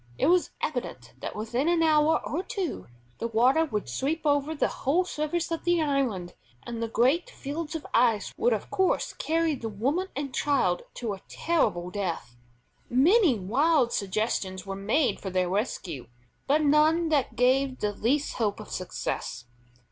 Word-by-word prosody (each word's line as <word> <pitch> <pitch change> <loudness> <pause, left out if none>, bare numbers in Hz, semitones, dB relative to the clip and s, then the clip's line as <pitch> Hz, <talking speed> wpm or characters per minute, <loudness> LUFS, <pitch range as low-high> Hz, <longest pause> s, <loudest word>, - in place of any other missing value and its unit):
It - - +1
was 355 +3 +3
evident 240 - -4
that - - -5
within 235 +7 -1
an 340 -1 +3
hour 310 0 +3
or 325 - -1
two 380 -2 -4 0.3
the 230 - -1
water 250 +8 +3
would 210 - -3
sweep 275 - -2
over 290 +1 +1
the - - +1
whole 330 +7 0
surface 330 0 -2
of 330 - -2
the 345 -1 +2
island, 260 - 0 0.3
and 235 -1 -5
the 230 - -1
great 265 - +2
fields 310 - -5
of 320 - -5
ice 230 -3 +2
would 480 +3 +2
of - - -2
course 380 -1 +1
carry 325 0 0
the 235 -5 -4
woman 275 - -1
and 275 -2 -4
child 225 -12 +1
to 230 -4 -3
a 190 - -9
terrible 180 - 0
death. 175 -11 -4 0.5
Many 310 - +4
wild 255 - +2
suggestions 190 -2 -2
were 195 0 -4
made 220 +9 +1
for 195 - -5
their 185 -1 0
rescue, 180 - -3 0.4
but 300 +3 +3
none 310 +3 +4
that 280 -7 +1
gave 260 +2 +2
the 210 0 -1
least 275 +8 0
hope 210 -3 0
of 215 - -10
success. 120 -9 -4
265 Hz, 165 wpm, -27 LUFS, 210-315 Hz, 0.5 s, Many